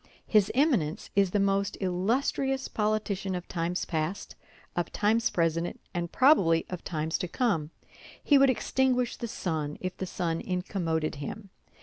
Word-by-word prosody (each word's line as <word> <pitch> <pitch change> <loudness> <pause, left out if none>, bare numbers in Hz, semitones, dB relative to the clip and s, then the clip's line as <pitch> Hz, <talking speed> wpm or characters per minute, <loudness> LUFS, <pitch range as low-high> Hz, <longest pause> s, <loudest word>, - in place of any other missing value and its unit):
His 210 -3 +3
Eminence 245 - +1
is 195 -1 +4
the 205 - +1
most 200 0 +1
illustrious 255 +8 0
politician 210 -3 -1
of 180 0 -5
times 175 +1 -2
past, 160 +4 -3 0.4
of 175 - -1
times 220 +2 +2
present, 165 0 0
and 175 0 -3
probably 190 - +4
of 180 - -5
times 160 -1 -2
to 180 - -2
come. 170 - 0 0.5
He 285 -2 +5
would 275 0 +6
extinguish 255 -1 +1
the 235 - -5
sun 155 -8 -3
if 185 0 -4
the 190 - -4
sun 165 -2 -2
incommoded 175 -5 -2
him. 195 +8 -7
185 Hz, 145 wpm, -28 LUFS, 165-220 Hz, 0.5 s, would